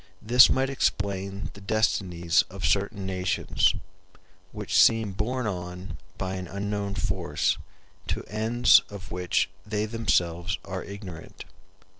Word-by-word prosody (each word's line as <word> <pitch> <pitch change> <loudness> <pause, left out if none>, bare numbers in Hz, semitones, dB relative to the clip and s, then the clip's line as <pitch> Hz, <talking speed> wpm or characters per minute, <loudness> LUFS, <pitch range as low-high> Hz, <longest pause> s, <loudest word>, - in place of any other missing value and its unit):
This 125 +3 +7
might 135 +1 +1
explain 100 -5 -1
the 100 - -13
destinies 95 -5 +1
of 95 -2 -5
certain 100 +4 0
nations, 95 -1 +1 0.8
which 105 -2 +2
seem 110 -3 +4
borne 120 +6 -2
on 90 -1 -5 0.2
by 95 0 -3
an 90 -1 -6
unknown 100 +1 -3
force 80 - -1 0.5
to - - -2
ends 110 +3 +4
of 100 0 -10
which 90 0 0 0.2
they 105 +1 -2
themselves 90 -5 0
are 95 -1 -5
ignorant. 100 -5 -9
100 Hz, 120 wpm, -26 LUFS, 95-110 Hz, 0.8 s, This